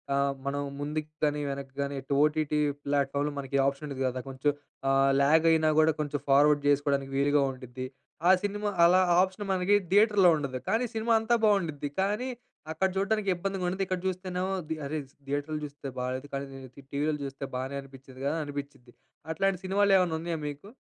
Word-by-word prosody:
ఆహ్, 140 0 +2
మనం 140 +1 -1 0.2
ముందుకు 150 +1 -3
కాని, 150 0 +1
వెనక్కి 135 -1 -6
కాని, 140 0 -2 0.3
ఓటీటీ 150 0 +1 0.3
ప్లాట్ఫామ్‌లో 140 +1 0
మనకి 140 0 -2
ఆప్షన్ 140 +2 -2
ఉండిది 135 -2 -3
కదా! 130 0 -3
కొంచెం 135 +2 0 0.4
ఆహ్, 135 0 +4
లాగ్ 160 +4 +4
అయినా 155 -1 +3
కూడా, 155 0 +5
కొంచెం 145 -1 -2
ఫార్వర్డ్ 145 +1 +5
చేసుకోవడానికి 140 -1 +1
వీలుగా 145 +1 +3
ఉండిది. 130 0 -7 0.4
ఆ - - +9
సినిమా 205 +1 -1 0.2
అలా, 180 +2 +6 0.2
ఆప్షన్ 190 +2 -2
మనకి 185 +2 +3 0.2
దియేటర్‌లో 205 -2 +6
ఉండదు. 135 -3 -3
కానీ 230 +3 +2
సినిమా 225 +1 +1
అంతా 225 +2 +2
బాగుండిద్ది. 165 -9 +1
కానీ 210 +6 -1 0.4
అక్కడ 175 +4 +1
చూడ్డానికి 200 +1 0
ఇబ్బందిగా 195 +1 -3
ఉండది, 190 +2 -1
ఇక్కడ 185 -1 -2
చూస్తేనేమో 185 0 -2 0.2
ది 160 - -1
అరే! 150 +3 -3 0.3
దియేటర్లో 145 +2 -2
చూస్తే 145 -1 -9
బాగాలేదు. 130 +2 -3
కానీ 140 0 -2
ని - - -9
ని 135 +2 -14
టీవీలో 150 +2 0
చూస్తే, 135 0 -6
బాగానే 130 +2 -3
అనిపించింది 135 -1 -14
కదా! 145 +3 +1
అనిపించిద్ది. 140 -4 -7 0.4
అట్లాంటి 195 +2 +1
సినిమాలేమన్నా, 190 -3 +3
ఉన్నాయా 165 0 -3
మీకు? 145 +6 -7
150 Hz, 165 wpm, -28 LUFS, 140-185 Hz, 0.4 s, ఆ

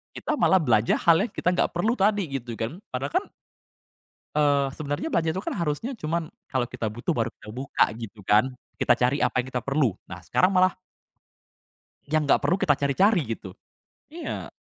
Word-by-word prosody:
Kita - - -2
malah 190 - +5
belanja 115 -5 +2
hal 170 +3 +4
yang - - -19
kita 180 - 0
gak - - +1
perlu 220 +7 +2
tadi 200 -3 +2
gitu 125 -4 -4
kan, 115 +10 -3
padahal - - -3
kan - - -16 1.1
eee, 140 -2 +3
sebenarnya 145 - -3
belanja 165 - +1
itu 190 - -4
kan - - -2
harusnya 170 - -2
cuman 165 -2 -2 0.2
kalau 130 -3 0
kita 120 -3 -4
butuh 120 - -2
baru 115 - 0
kita - - -16
buka 130 +3 +1
gitu 110 -3 -8
kan, 105 +3 +5 0.3
kita - - +3
cari 125 +3 +2
apa 125 - 0
yang 125 - -7
kita 125 -2 -3
perlu. 135 -8 +1
Nah 95 -2 -9
sekarang 185 - +2
malah 185 0 +3 1.3
yang 155 +1 +1
gak - - +5
perlu 180 - +1
kita 145 -7 +2
cari-cari 160 - +2
gitu. 95 - -10 0.6
Iya. 330 +2 -6
145 Hz, 180 wpm, -25 LUFS, 125-180 Hz, 1.3 s, malah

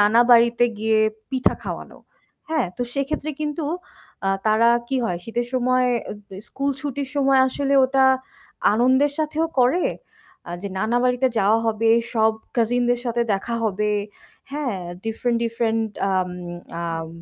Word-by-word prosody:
নানা 210 +3 +5
বাড়িতে 235 0 +5
গিয়ে 220 0 +2 0.3
পিঠা 260 -1 +1
খাওয়ানো, - - -7 0.5
হ্যাঁ? 315 -9 +1
তো - - -2
সেক্ষেত্রে 290 +2 -2
কিন্তু 300 +2 -2 0.6
আ - - +3 0.2
তারা 220 +2 +4 0.2
কি 270 - 0
হয়? 175 -6 -1
শীতের 240 +1 -2
সময় 255 0 +2 0.4
দে 190 - -10
স্কুল 275 +1 -2
ছুটির 280 -1 -4
সময় 275 -1 +3
আসলে 275 +1 0
ওটা 265 +1 +3 0.7
আনন্দের 260 +6 +3
সাথেও 310 +1 0
করে 260 +9 +3 0.6
আ - - -6
যে 200 - -3
নানা 220 +4 0
বাড়িতে 250 +1 +2
যাওয়া 215 +2 +4
হবে, 225 0 +2 0.2
সব 220 -1 +4 0.2
কাজিনদের 245 +1 +2
সাথে 240 -1 0
দেখা 195 +4 -3
হবে। 210 0 0 0.6
হ্যাঁ, 275 -8 -2 0.3
ডিফরেন্ট 235 +2 -1
different 225 -1 0 0.2
আম 185 -1 0 0.5
আম 165 -1 -3
240 Hz, 140 wpm, -22 LUFS, 220-270 Hz, 0.7 s, নানা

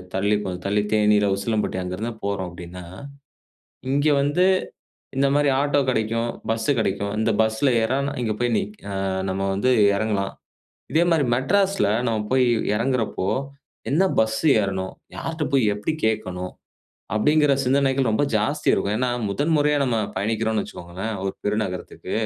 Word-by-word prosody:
தள்ளி 100 +2 +2
கொஞ்சம் 90 -2 -5
தள்ளி 105 +1 +2
தேனீ 105 0 +4
இல்ல 105 - +2
உசிலம்பட்டி 105 -2 -1
அங்கருந்துதான் 110 +5 -5
போறோம் 100 -3 -2
அப்டின்னா, 85 +1 -9 1.1
இங்க 145 +2 +2
வந்து 145 +6 +2 0.7
இந்தமாரி 140 +1 +3
ஆட்டோ 145 0 +2
கடைக்கும். 115 0 0 0.2
பஸ் 115 0 -1
கடைக்கும். 100 -1 -1
இந்த 110 +1 +2
பஸ்ல 110 +5 +2
ஏறுனா 140 +5 0
இங்க 110 -2 0
போய் 120 -1 +1
நிக் 210 0 -4
அ - - -4 0.4
நம்ம 95 +1 -2
வந்து 115 +7 +1 0.2
எறங்கலாம். 100 -2 -1 0.6
இதே 165 +2 +4
மாரி 160 -4 +3
மெட்ராஸ்ல 195 - +2 0.2
நம்ம 115 -2 0
போய் 130 -1 +4 0.3
எறங்குறப்போ, 115 -4 -1 0.6
என்ன 160 +7 +3 0.2
பஸ் 110 0 +1 0.2
ஏறணும்? 95 -1 -3 0.2
யார்ட்ட 165 -1 -3
போய் 135 -3 +4
எப்டி 105 +10 -2
கேட்கணும்? 90 -4 -2 0.6
அப்டிங்கற 150 +5 +3
சிந்தனைகள் 135 -1 +2
ரொம்ப 110 +7 +2
ஜாஸ்தி 105 +1 -1
இருக்கும். 105 +2 0
ஏன்னா, 125 -1 +1 0.2
முதன் 145 +11 0
முறையா 150 0 +2
நம்ம 120 -3 0 0.2
பயணிக்கிறோன்னு 110 +2 0
வச்சுக்கோங்களேன்! 95 +6 -6
ஒரு 95 - -1
பெரு 105 +1 0
நகரத்துக்கு. 90 -2 -7
110 Hz, 145 wpm, -23 LUFS, 100-140 Hz, 1.1 s, தேனீ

